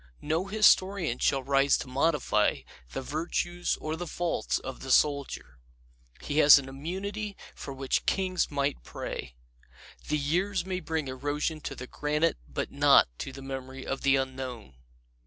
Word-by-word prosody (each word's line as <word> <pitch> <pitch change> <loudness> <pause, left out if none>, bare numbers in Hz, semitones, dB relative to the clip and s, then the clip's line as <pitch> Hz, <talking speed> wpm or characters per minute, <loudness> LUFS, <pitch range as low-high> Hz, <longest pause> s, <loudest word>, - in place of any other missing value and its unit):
No 160 +5 0
historian 195 - +3
shall 135 -1 +2
rise 140 +1 +3
to - - -6
modify 140 +3 +1 0.3
the 135 - -4
virtues 175 +4 -2
or 155 +1 -3
the 175 +1 -5
faults 175 +1 -1
of 130 - -7
the 135 - -8
Soldier. 140 - +1 0.6
He 145 +1 -1
has 145 -1 +10
an 135 -1 -3
immunity 195 +9 -5 0.2
for - - -8
which 135 0 -1
kings' 185 -2 +1
might 140 -1 -1
pray. 60 -1 -6 0.7
The 150 - +1
years 175 +6 0
may 185 -1 -2
bring 160 -5 -3
erosion 145 +4 -2
to 135 - -5
the 125 - -7
granite 150 - 0
but - - -4
not - - +5
to - - -4
the 135 0 -10
memory 135 0 -6
of 135 - -3
the 135 0 +4
Unknown. 130 - -4
145 Hz, 155 wpm, -28 LUFS, 135-175 Hz, 0.7 s, has